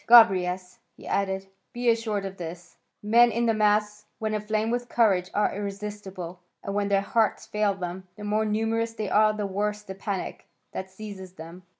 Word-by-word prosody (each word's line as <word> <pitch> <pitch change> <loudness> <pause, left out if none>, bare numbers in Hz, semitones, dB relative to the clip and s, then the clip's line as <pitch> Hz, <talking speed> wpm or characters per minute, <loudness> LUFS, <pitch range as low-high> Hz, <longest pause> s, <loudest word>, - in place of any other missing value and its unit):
Gobryas," 185 -6 +6 0.2
he - - -13
added, 195 -1 0 0.3
"be 245 0 -2
assured 220 -3 -1
of 195 0 -6
this; 170 0 -8 0.3
men 235 +3 +6
in 235 +2 +1
the 225 - +3
mass, 210 -1 +2
when 220 -1 -2
aflame 215 +1 0
with 245 0 -2
courage, 195 -6 +3
are 210 - +1
irresistible, 200 -3 -5 0.2
and 200 - -3
when 205 0 +1
their 200 -1 +3
hearts 220 +1 +1
fail 210 -2 +1
them, 185 0 -5
the 210 - -9
more 210 +1 +1
numerous 225 +2 0
they 215 -4 -3
are 215 0 +5
the 210 -1 -3
worse 210 +2 -1
the 190 - -7
panic 195 0 -4 0.2
that 190 0 -5
seizes 190 -2 -9
them. 175 +2 -11
205 Hz, 180 wpm, -27 LUFS, 190-215 Hz, 0.3 s, Gobryas